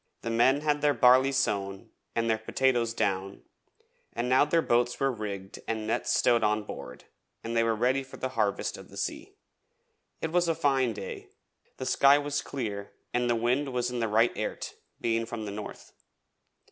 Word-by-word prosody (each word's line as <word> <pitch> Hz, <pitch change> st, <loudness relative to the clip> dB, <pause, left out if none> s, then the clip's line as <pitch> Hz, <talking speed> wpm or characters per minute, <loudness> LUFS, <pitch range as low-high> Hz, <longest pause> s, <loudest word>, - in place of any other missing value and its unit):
The 115 Hz, -, -2 dB
men 130 Hz, +5 st, +4 dB
had 150 Hz, -1 st, +1 dB
their 145 Hz, -1 st, +3 dB
barley 130 Hz, +2 st, +6 dB
sown, 100 Hz, -4 st, -1 dB, 0.2 s
and 115 Hz, 0 st, +1 dB
their 110 Hz, -1 st, +1 dB
potatoes 120 Hz, 0 st, +1 dB
down, 95 Hz, -3 st, -2 dB, 0.7 s
and 120 Hz, +1 st, -2 dB
now 130 Hz, +2 st, +5 dB
their 165 Hz, +2 st, +2 dB
boats 120 Hz, +1 st, +1 dB
were 135 Hz, 0 st, +2 dB
rigged 100 Hz, -4 st, -6 dB
and 110 Hz, -1 st, -2 dB
nets 110 Hz, -, -1 dB
stowed 120 Hz, -2 st, +3 dB
on 105 Hz, 0 st, +2 dB
board 65 Hz, -10 st, -9 dB, 0.4 s
and 115 Hz, +1 st, -4 dB
they 115 Hz, -, +4 dB
were 115 Hz, -1 st, +1 dB
ready 125 Hz, +5 st, +2 dB
for 135 Hz, 0 st, -11 dB
the 130 Hz, -, -3 dB
harvest 105 Hz, -6 st, -1 dB
of -, -, -13 dB
the -, -, -12 dB
sea. -, -, -4 dB, 0.8 s
It 160 Hz, -, -3 dB
was 175 Hz, 0 st, +2 dB
a 165 Hz, -, +1 dB
fine 135 Hz, -6 st, +2 dB
day, 105 Hz, -, -7 dB, 0.5 s
the 130 Hz, -, -5 dB
sky 140 Hz, +2 st, +5 dB
was 145 Hz, 0 st, -1 dB
clear 105 Hz, -7 st, -5 dB, 0.2 s
and 120 Hz, 0 st, +1 dB
the 120 Hz, -, +3 dB
wind 125 Hz, +5 st, 0 dB
was 125 Hz, 0 st, -1 dB
in 125 Hz, -, -3 dB
the 115 Hz, -, 0 dB
right 110 Hz, +3 st, +3 dB
airt, -, -, -4 dB, 0.3 s
being 115 Hz, 0 st, 0 dB
from 115 Hz, -2 st, -5 dB
the 100 Hz, -, -5 dB
north. 105 Hz, +1 st, -8 dB
120 Hz, 185 wpm, -28 LUFS, 110-135 Hz, 0.8 s, barley